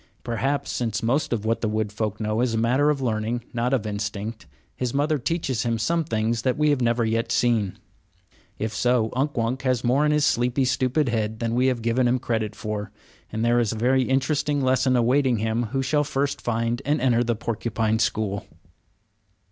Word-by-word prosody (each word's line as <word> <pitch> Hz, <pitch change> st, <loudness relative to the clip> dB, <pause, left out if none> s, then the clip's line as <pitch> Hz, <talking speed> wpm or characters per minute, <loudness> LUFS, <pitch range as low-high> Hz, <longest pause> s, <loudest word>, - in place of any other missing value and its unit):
Perhaps 135 Hz, +5 st, -1 dB
since 115 Hz, -2 st, -2 dB
most 130 Hz, +7 st, +1 dB
of 110 Hz, -3 st, -1 dB
what 115 Hz, +1 st, 0 dB
the 110 Hz, -, 0 dB
wood 110 Hz, -1 st, -1 dB
folk 105 Hz, 0 st, -3 dB
know 110 Hz, +1 st, 0 dB
is 120 Hz, -2 st, +1 dB
a -, -, +1 dB
matter 125 Hz, +6 st, +3 dB
of 140 Hz, -3 st, 0 dB
learning, 115 Hz, 0 st, -1 dB
not 120 Hz, +1 st, 0 dB
of 125 Hz, -5 st, +1 dB
instinct 105 Hz, -1 st, -4 dB, 0.3 s
his 125 Hz, 0 st, -3 dB
mother 150 Hz, +1 st, +1 dB
teaches 135 Hz, -2 st, -1 dB
him 115 Hz, -1 st, 0 dB
some 165 Hz, +10 st, +1 dB
things 115 Hz, -4 st, -1 dB
that 130 Hz, 0 st, 0 dB
we 150 Hz, 0 st, +3 dB
have 140 Hz, -3 st, +1 dB
never 120 Hz, 0 st, +2 dB
yet 115 Hz, +1 st, -1 dB
seen. 115 Hz, -6 st, +1 dB, 0.8 s
If 110 Hz, 0 st, -3 dB
so, 120 Hz, -3 st, +1 dB
Unk 140 Hz, +2 st, -1 dB
Wunk 120 Hz, +3 st, 0 dB
has 130 Hz, -3 st, 0 dB
more 130 Hz, +4 st, +3 dB
in 150 Hz, -, +3 dB
his 150 Hz, 0 st, +3 dB
sleepy, 125 Hz, 0 st, +1 dB
stupid 130 Hz, +2 st, +1 dB
head 110 Hz, -1 st, -1 dB
than 115 Hz, 0 st, -2 dB
we 125 Hz, +2 st, +2 dB
have 125 Hz, -3 st, 0 dB
given 120 Hz, +2 st, +2 dB
him 125 Hz, +1 st, +2 dB
credit 110 Hz, -3 st, -2 dB
for, 105 Hz, -1 st, -4 dB, 0.4 s
and 110 Hz, +1 st, -1 dB
there 120 Hz, +1 st, +3 dB
is 115 Hz, -2 st, +1 dB
a -, -, -5 dB
very 130 Hz, +4 st, +3 dB
interesting 140 Hz, +2 st, 0 dB
lesson 130 Hz, 0 st, +2 dB
awaiting 125 Hz, +1 st, +3 dB
him 110 Hz, +2 st, 0 dB
who 135 Hz, +5 st, -2 dB
shall 145 Hz, +3 st, +2 dB
first 140 Hz, -1 st, -2 dB
find 115 Hz, 0 st, -1 dB
and 145 Hz, +2 st, +1 dB
enter 120 Hz, -2 st, +3 dB
the 120 Hz, -1 st, 0 dB
porcupine 110 Hz, 0 st, -1 dB
school. 105 Hz, -3 st, -1 dB
120 Hz, 200 wpm, -24 LUFS, 110-130 Hz, 0.8 s, matter